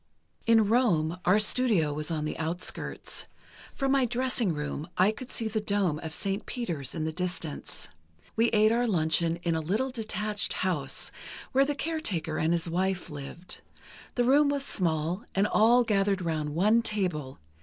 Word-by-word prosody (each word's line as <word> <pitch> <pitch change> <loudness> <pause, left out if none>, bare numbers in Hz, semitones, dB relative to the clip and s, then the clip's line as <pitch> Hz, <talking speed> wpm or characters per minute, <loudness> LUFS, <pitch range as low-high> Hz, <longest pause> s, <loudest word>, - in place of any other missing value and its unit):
"In 225 -2 +5
Rome, 180 -8 +2
our 185 +4 +5
studio 210 - +3
was 150 +2 -3
on 155 -2 -2
the 155 - -3
outskirts. 165 +3 -2 0.5
From 270 -1 0
my 270 -2 +3
dressing 245 -4 0
room, 150 0 -4
I 190 +3 +5
could 250 +3 -9
see 225 - -1
the 215 0 -1
dome 200 -7 +1
of 160 -1 -6
St. 195 +5 -2
Peter's 170 - -3
in 160 - -2
the 160 - -1
distance. 175 -3 -4 0.5
We 230 +1 +3
ate 215 0 +4
our 240 +1 +2
luncheon 165 -3 +1
in 170 - +1
a 160 - 0
little 215 +12 -1
detached 215 -3 -2
house, 170 -8 0 0.4
where 270 +1 +4
the 290 +1 -1
caretaker 240 - -2
and 160 +1 +1
his 170 0 +1
wife 180 +1 -1
lived. 145 +5 -7 0.5
The 245 - +2
room 285 +4 +4
was 280 -1 -1
small, 170 - -1
and 195 +1 +3
all 235 +4 +4
gathered 200 -3 +1
round 155 -3 -2
one 210 +7 +4
table 180 - -2
190 Hz, 165 wpm, -28 LUFS, 160-230 Hz, 0.5 s, In